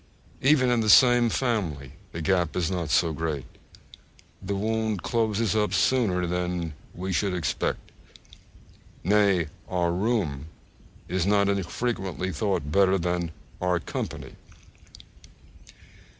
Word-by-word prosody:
Even 130 -2 +4
in 120 -2 +2
the 110 - 0
same 120 +1 +6
family 95 - -2 0.2
the 80 - -5
gap 90 -3 +1
is 90 -1 0
not 85 -4 -2
so 80 0 +2
great; 75 -4 -3 1.0
the 100 +1 -3
wound 110 -1 -1
closes 110 -2 0
up 105 -1 +1
sooner 100 -9 +2
than 90 -2 -2 0.2
we 95 +2 -3
should 95 +1 0
expect. 85 -3 -2 1.1
Nay, 100 -3 +3 0.2
our 90 -2 +1
room 90 - -1 0.6
is 90 0 -1
not 100 -1 +3
unfrequently 95 0 -2
thought 95 -9 -1
better 95 +2 +4
than 85 -1 -1 0.3
_our 90 -1 +1
company. - - -5
95 Hz, 115 wpm, -26 LUFS, 85-110 Hz, 1.1 s, same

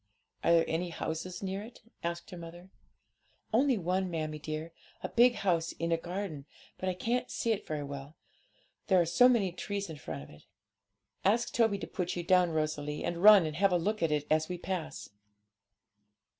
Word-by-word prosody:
'Are - - +4
there 165 -1 +5
any 170 +2 -1
houses 170 +3 -4
near 195 +1 -3
it?' 225 +2 -12 0.2
asked 170 +2 -4
her 180 - -7
mother. 175 +2 -10 0.8
'Only 260 +1 +4
one, 185 +1 0
mammie 155 -2 -3
dear, 155 +2 -5 0.3
a - - -2
big 240 +1 +5
house 170 -4 0
in 170 0 -3
a - - +5
garden; 170 -4 -5 0.3
but 185 - -1
I 185 - -2
can't 235 +7 -1
see 230 - -1
it 215 - -2
very 150 -2 -3
well, 140 +2 -7 0.7
there 190 -3 +5
are 170 - +3
so 245 +10 +6
many 210 -7 +2
trees 200 +1 -4
in 155 - -8
front 80 - -6
of - - -14
it.' 75 - -17 0.8
'Ask 225 +5 +2
Toby 225 -4 +3
to - - -5
put 180 -1 -3
you 175 - -3
down, 180 0 +4
Rosalie, 155 -2 -2
and 170 0 -2
run 205 -3 +9
and 155 -1 -4
have 195 +1 +4
a 180 - +4
look 210 +6 -1
at 165 -2 +2
it 150 -1 0
as 155 +1 +2
we 180 - -3
pass.' 160 - -5
175 Hz, 195 wpm, -31 LUFS, 160-195 Hz, 0.8 s, run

